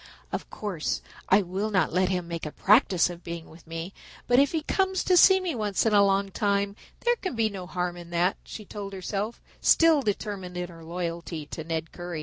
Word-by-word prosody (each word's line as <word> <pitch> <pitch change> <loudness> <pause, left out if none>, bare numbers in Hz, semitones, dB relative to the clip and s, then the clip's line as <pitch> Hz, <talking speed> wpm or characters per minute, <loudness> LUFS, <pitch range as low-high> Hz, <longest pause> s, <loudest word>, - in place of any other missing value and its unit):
"Of - - -4
course 190 -7 -3 0.3
I 195 +2 +5
will 190 +4 -2
not 190 -6 +1
let 185 +1 +2
him 180 -2 -1
make 170 -2 -4
a - - -6
practice 195 - +4
of 175 0 -10
being 170 -1 -7
with 165 +1 -16
me, 165 +3 -5 0.3
but 245 +1 +4
if 280 0 +4
he 320 -2 -1
comes 380 +3 +1
to 365 - +3
see 380 +2 +7
me 370 -3 -2
once 210 -4 0
in 220 - +3
a 200 -1 +7
long 195 0 +2
time 200 -1 0 0.3
there 480 0 +2
can 370 - -4
be 225 -1 +2
no 190 -3 -7
harm 180 -1 -2
in 170 -1 -10
that," 175 +2 +1
she 215 - -9
told 200 -1 -7
herself, 200 +4 -3 0.2
still 325 -3 +5
determined 200 -5 -3
in 180 0 -3
her 165 -1 -12
loyalty 170 -2 -4
to 160 - -5
Ned 160 0 -3
Currie. 175 -2 -6
190 Hz, 215 wpm, -27 LUFS, 175-215 Hz, 0.3 s, see